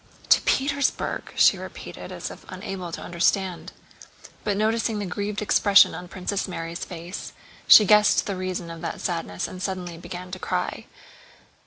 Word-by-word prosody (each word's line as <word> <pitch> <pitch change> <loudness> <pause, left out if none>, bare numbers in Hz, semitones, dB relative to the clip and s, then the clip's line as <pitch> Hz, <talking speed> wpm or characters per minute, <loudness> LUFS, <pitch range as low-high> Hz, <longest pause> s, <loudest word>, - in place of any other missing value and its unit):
"To - - +7
Petersburg!" 280 +1 0
she - - +5
repeated - - -9
as - - -5
if - - -12
unable 185 -3 -6
to - - -6
understand. 180 +1 0 0.7
But 205 -2 0
noticing 220 +1 +1
the 205 - -3
grieved 205 +3 -3
expression 200 -1 +5
on 180 - -7
Princess 185 +3 -3
Mary's 170 -2 -5
face 175 +2 -7 0.3
she 215 - +10
guessed 210 +1 +5
the 200 - -3
reason 185 -2 -4
of 165 -1 -9
that 170 - -4
sadness 165 - -3
and 185 - -9
suddenly 180 -3 -4
began 180 +1 -8
to 185 - -6
cry. - - -3
185 Hz, 155 wpm, -25 LUFS, 175-205 Hz, 0.7 s, she